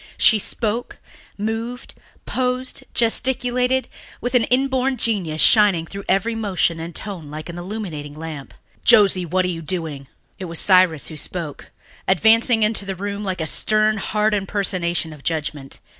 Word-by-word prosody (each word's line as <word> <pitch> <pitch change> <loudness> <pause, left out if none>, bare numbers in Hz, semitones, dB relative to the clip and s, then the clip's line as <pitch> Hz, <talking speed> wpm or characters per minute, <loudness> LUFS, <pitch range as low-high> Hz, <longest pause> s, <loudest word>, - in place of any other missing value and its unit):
She 220 - +5
spoke, 225 +3 -3 0.4
moved, 225 +4 -4 0.3
posed, 255 0 -2
gesticulated, 250 +2 +1 0.3
with 245 - -3
an 245 -3 +4
inborn 265 +1 +1
genius 185 -10 0
shining 205 -7 +5
through 200 +3 -8
every 210 +4 +2
motion 190 -6 0
and 165 +1 -7
tone 185 -8 -5
like 155 +3 -7
an 170 - -7
illuminating 175 -7 -6
lamp. 155 -3 -8 0.3
"Josie, 190 -4 +5
what 185 +3 +1
are - - 0
you 165 -2 -4
doing?" 155 -4 -4 0.3
It 190 - -5
was 165 -1 -5
Cyrus 185 -6 +4
who 155 - -8
spoke, 155 -1 -5 0.4
advancing 225 +4 +4
into 210 -1 +1
the 195 -1 -4
room 200 +2 -4
like 185 -3 -3
a - - -1
stern, 215 +6 +1
hard 210 +1 0
impersonation 185 -5 -1
of 145 -2 -14
judgment. 150 -4 -3
195 Hz, 150 wpm, -21 LUFS, 165-225 Hz, 0.4 s, She